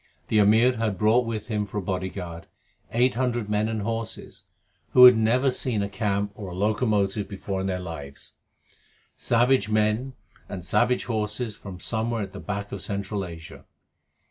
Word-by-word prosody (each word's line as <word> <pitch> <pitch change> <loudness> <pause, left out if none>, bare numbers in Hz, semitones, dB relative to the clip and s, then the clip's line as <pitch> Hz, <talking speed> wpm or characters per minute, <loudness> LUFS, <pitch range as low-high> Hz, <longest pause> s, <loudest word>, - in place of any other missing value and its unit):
The 110 - +3
Amir 110 +4 +5
had 110 -4 -1
brought 110 +4 +3
with 110 -2 -4
him 105 -2 0
for 100 - -6
a - - 0
bodyguard 90 -2 -4 0.4
eight 125 +3 +3
hundred 120 -3 -1
men 105 +1 +1
and 110 -2 -2
horses 115 +1 -4 0.5
who 125 - +10
had 125 -1 +10
never 120 +5 +2
seen 120 -4 0
a 100 - -3
camp 100 0 -1
or 100 -2 -8
a 90 - -7
locomotive 105 0 0
before 100 -1 -4
in 95 - -2
their 95 -1 -1
lives 75 -6 -8 0.8
savage 120 -2 +2
men 110 +5 +1 0.4
and 95 -4 -6
savage 125 +6 +2
horses 110 0 -2
from 95 -4 -9
somewhere 115 +2 -2
at 95 -1 -8
the 100 - -7
back 100 0 -5
of 100 - -5
Central 100 0 -3
Asia. 85 -2 -10
105 Hz, 170 wpm, -25 LUFS, 100-115 Hz, 0.8 s, who